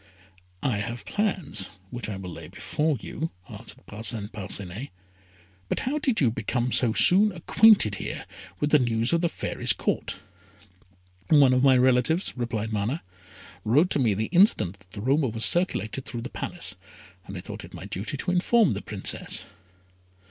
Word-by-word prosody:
"I 125 -6 +1
have 115 +1 -4
plans 185 - -1 0.2
which 120 -3 -5
I 105 - -4
will 95 -2 -7
lay - - -9
before 150 -2 -1
you," 160 +9 -4 0.2
answered - - -9
Parcin 105 -1 -1
Parcinet; 100 +3 -5 0.8
"but - - -1
how 290 +4 -1
did 260 -6 +1
you 125 -6 +3
become 120 +3 -1
so 120 -3 +3
soon 195 - +5
acquainted 185 - +5
here - - -5 0.3
with 145 0 0
the 150 - +6
news 115 +1 +1
of 170 - +2
the 170 - +1
Fairy's - - 0
Court?" - - -2 1.1
"One 140 -4 +6
of 125 - +3
my 135 -1 +6
relatives," 130 +7 +2
replied 115 -3 -3
Mana, 110 +10 -2 0.6
"wrote 145 - +3
to - - +1
me 115 -6 +2
the 110 +3 -1
instant 175 - +3
that 95 -2 -25
the 100 +1 -8
rumour 135 +4 +2
was 110 0 +1
circulated 135 - +2
through 120 -2 -5
the 125 - -6
Palace, 100 - -5 0.5
and 95 - -7
I - - -5
thought - - -8
it - - -11
my - - -8
duty 105 +9 -5
to 180 - -2
inform 185 - +3
the 100 - -4
Princess." 100 -2 -2
125 Hz, 170 wpm, -26 LUFS, 105-160 Hz, 1.1 s, the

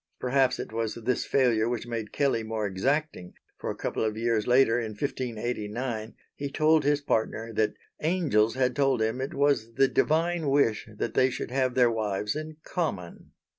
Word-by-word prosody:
Perhaps 130 0 +2
it - - -6
was 115 -1 -2
this 120 +1 -1
failure 120 -4 +2
which 120 -1 -3
made 115 -3 -4
Kelley 140 -5 +1
more 110 -1 -3
exacting, 105 - -1 0.2
for - - -4
a - - -3
couple - - -2
of 110 -1 -1
years 115 -2 0
later 125 -1 +4
in 110 -2 -4
1589, 115 -1 -3 0.2
he 140 0 -4
told 155 +2 +3
his 145 0 +2
partner 115 -3 -1
that 110 0 +1 0.3
angels 150 - +2
had 130 -1 +1
told 135 -3 +2
him 110 +3 0
it 135 - -4
was 140 -5 +1
the 135 - +5
divine 165 +2 +1
wish 125 -7 +2
that - - -2
they 130 - +4
should 125 - -5
have 130 -1 0
their 125 -2 +5
wives 105 -1 -2
in 155 0 -6
common. 100 - -4
120 Hz, 175 wpm, -27 LUFS, 110-140 Hz, 0.3 s, the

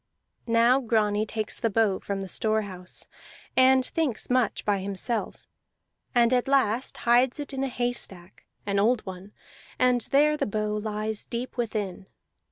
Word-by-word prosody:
Now 235 +3 +4
Grani 215 -3 +1
takes 215 -1 -2
the 230 - +1
bow 210 -2 +2
from 200 -1 -4
the 195 - -5
store 220 +3 0
house, 185 -2 -6 0.5
and 260 0 +5
thinks 275 -8 -1
much 250 -3 +1
by 205 -1 +1
himself, 200 +4 -4 0.7
and 240 0 +4
at 250 0 +2
last 260 -3 +1
hides 245 +4 +4
it 290 -1 -6
in 270 0 -2
a - - 0
haystack, 240 -8 -4 0.2
an 200 -1 0
old 225 +3 +2
one; 190 +1 -8 0.5
and 250 -1 +3
there 300 +2 +4
the - - -1
bow 210 0 -1
lies 215 0 -3
deep 240 +1 -5
within. 210 -6 -3
225 Hz, 155 wpm, -26 LUFS, 205-250 Hz, 0.7 s, and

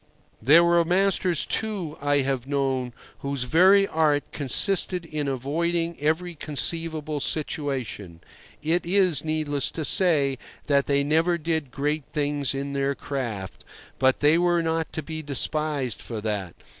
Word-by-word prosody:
There 150 +9 +6
were 170 0 +3
masters, 180 -1 +1
too, 200 -8 -2
I 145 0 +2
have 135 -2 -2
known, 135 -3 -1 0.3
whose 140 -2 -3
very 190 +9 +4
art 155 -4 +1
consisted 175 +5 +2
in 155 -3 -4
avoiding 165 +6 -1
every 160 +4 -1
conceivable 155 +1 -1
situation. 135 - -3 0.4
It 165 +3 +1
is 180 -3 +2
needless 155 -3 -1
to 160 - -4
say 140 -7 +3 0.3
that 140 -1 +1
they 140 0 +2
never 165 +4 +1
did 160 -3 -2
great 145 +3 -2
things 145 -2 -1
in 140 +1 -4
their 140 0 -1
craft; 115 -11 -5 0.4
but 130 0 +2
they 150 +3 +4
were 175 -1 +2
not 160 0 -2
to 160 - -4
be 160 +1 -6
despised 145 -3 0
for 115 -3 -6
that. 105 -5 -4
150 Hz, 140 wpm, -24 LUFS, 140-165 Hz, 0.4 s, There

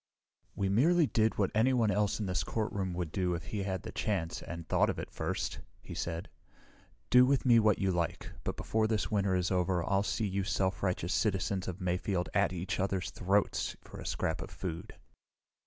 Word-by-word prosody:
"We 100 - 0
merely 155 - +4
did 110 -4 +1
what 100 -2 +1
anyone 115 -1 +3
else 105 +2 +1
in 105 - -1
this 90 -2 0
courtroom 100 -5 -2
would 85 -3 -3
do 90 -1 0
if 85 - -5
he 100 +5 -4
had 95 -2 -3
the - - -6
chance, 95 -6 -2
and 85 -1 -7
thought - - +3
of - - -2
it - - -6
first," - - -3 0.2
he - - -9
said. 85 +1 -3 0.8
"Do 125 0 +8
with 135 +1 +2
me 120 -2 +7
what 105 -2 +4
you 95 -1 +1
like, 85 -2 -2
but - - -3
before 110 0 +1
this 110 0 -1
winter 100 -3 +2
is 90 0 0
over, 90 -1 +1
I'll 100 0 +3
see 105 +1 -1
you 100 0 -1
self 95 0 0
righteous 90 -2 0
citizens 95 -2 0
of 95 -1 -4
Mayfield 90 0 -1
at 100 -2 +3
each 90 0 -3
other's 95 -1 -1
throats 100 +2 0
for - - -11
a - - -8
scrap 80 +1 -1
of - - -6
food." 85 -4 -6
95 Hz, 200 wpm, -32 LUFS, 90-105 Hz, 0.8 s, Do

